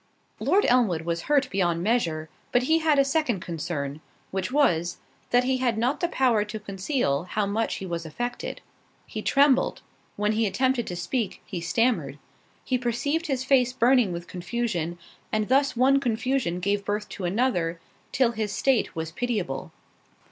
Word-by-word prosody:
Lord 405 +2 +3
Elmwood 220 -10 +3
was 170 0 -2
hurt 285 -2 +4
beyond 175 -3 +1
measure; 170 -8 0 0.2
but 245 - +3
he 320 +5 +3
had 315 -2 +3
a 275 - +5
second 275 - +1
concern, 155 -4 -4 0.3
which 190 +3 -2
was, 175 - +2 0.3
that 245 0 +4
he 260 +1 +1
had 245 -3 0
not 245 +5 +1
the 345 - +1
power 250 -9 +2
to 215 +1 -6
conceal 195 - -1
how 205 +3 -1
much 220 +3 -1
he 195 - -6
was 170 -2 -3
affected. 240 +10 -5 0.4
He - - -6
trembled—when 265 -6 +1
he 220 0 +1
attempted 255 +4 +1
to 175 - -4
speak, 185 +5 -3
he 180 -4 -5
stammered—he 180 - -2
perceived 285 +7 -1
his 265 -3 -1
face 260 -2 +3
burning 245 -4 +4
with 170 0 -5
confusion, 180 -2 -3 0.3
and 215 0 0
thus 270 -1 +3
one 270 +2 +5
confusion 240 -6 0
gave 200 +2 0
birth 205 +1 -2
to 185 - -5
another, 175 -5 0 0.3
till 250 -3 +3
his 215 -3 -3
state 260 +1 +1
was 160 0 -4
pitiable. 205 - -3
220 Hz, 160 wpm, -26 LUFS, 175-255 Hz, 0.4 s, a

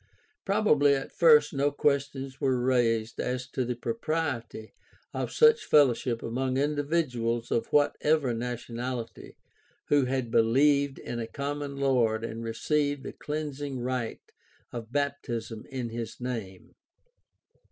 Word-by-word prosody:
Prob 210 +2 +1
ably 145 -3 +5
at 135 - -5
first 150 -3 +5
no 140 +1 +2
questions 140 -2 -1
were 130 -2 +2
raised 115 -3 +1
as 125 0 -2
to 130 -1 -2
the 125 0 -2
propriety 145 - -3 0.4
of - - -3
such 460 -1 +5
fellowship 125 -4 +3
among 130 +2 -1
individuals 140 -5 0
of 115 - 0
whatever 145 -2 +2
nationality 120 0 -5 0.5
who 145 -2 +4
had 125 -2 -2
believed 140 +5 +3
in 120 - -5
a 115 - -3
common 145 +1 -4
Lord 120 -5 +1
and 115 0 -6
received 145 +5 -1
the - - -6
cleansing 145 -3 -4
rite 125 -2 -4 0.4
of 115 -1 -7
baptism 120 -6 -3
in 130 -3 -4
his 115 0 -6
name. 115 -7 -6
130 Hz, 125 wpm, -28 LUFS, 120-145 Hz, 0.5 s, ably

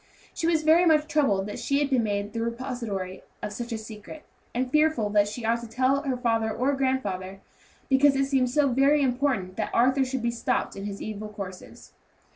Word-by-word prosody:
She 330 - -2
was 320 -2 +2
very 330 +3 +5
much 305 -1 +4
troubled 270 -12 +1
that 205 - -6
she 280 - 0
had 285 -1 0
been 255 -3 +3
made 205 -1 -2
the 230 - -2
repository 230 -6 -4 0.2
of 210 - -4
such 240 +3 -6
a 225 - -2
secret, 220 +7 -10 0.3
and 250 +1 -2
fearful 305 -9 +2
that 205 -1 +4
she 220 +3 -6
ought 230 +1 +2
to 235 - -8
tell 260 +4 +1
her 270 -3 -2
father 225 -2 0
or 260 +5 0
grandfather, 200 -9 -2 0.5
because 270 +1 +4
it 275 0 +2
seemed 265 -2 +1
so 285 +3 +2
very 275 +3 +3
important 245 -8 0
that 215 - -1
Arthur 260 +3 +4
should 260 -2 -3
be 235 - +1
stopped 240 +1 -1
in 195 - -6
his 200 -1 -5
evil 215 0 -6
courses. 195 -3 -9
245 Hz, 205 wpm, -26 LUFS, 210-275 Hz, 0.5 s, very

